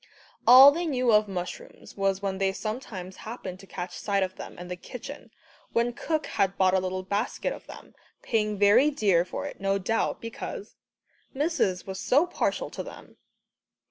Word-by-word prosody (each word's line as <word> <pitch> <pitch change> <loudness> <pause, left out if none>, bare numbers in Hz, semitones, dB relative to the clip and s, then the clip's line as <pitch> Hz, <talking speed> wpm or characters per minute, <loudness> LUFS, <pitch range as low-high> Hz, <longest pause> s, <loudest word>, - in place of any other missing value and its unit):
All 260 +3 +11
they 340 +3 -2
knew 255 -5 +2
of 210 0 +5
mushrooms 180 -2 -7
was 195 0 0
when 195 -1 -2
they 195 0 +1
sometimes 200 -4 -6
happened 195 -5 -7
to 195 - -14
catch 180 -1 -6
sight 200 -2 +1
of 185 0 -4
them - - -9
in 175 - -8
the 180 - -4
kitchen, 260 +9 -9 0.4
when 235 +1 +1
cook 310 +4 -2
had 195 0 0
bought 185 -1 +4
a 190 - +4
little 185 0 -3
basket 205 +5 -2
of - - -12
them, - - -12 0.3
paying 210 -2 0
very 210 +8 +5
dear 200 - +2
for 180 - -5
it, 285 - -8
no 195 0 +1
doubt, 210 +4 -1
because 315 - -7 0.6
"Missis 280 - 0
was 190 -1 -6
so 285 +7 +3
partial - - -2
to - - -5
them." - - -11
205 Hz, 175 wpm, -27 LUFS, 190-250 Hz, 0.6 s, All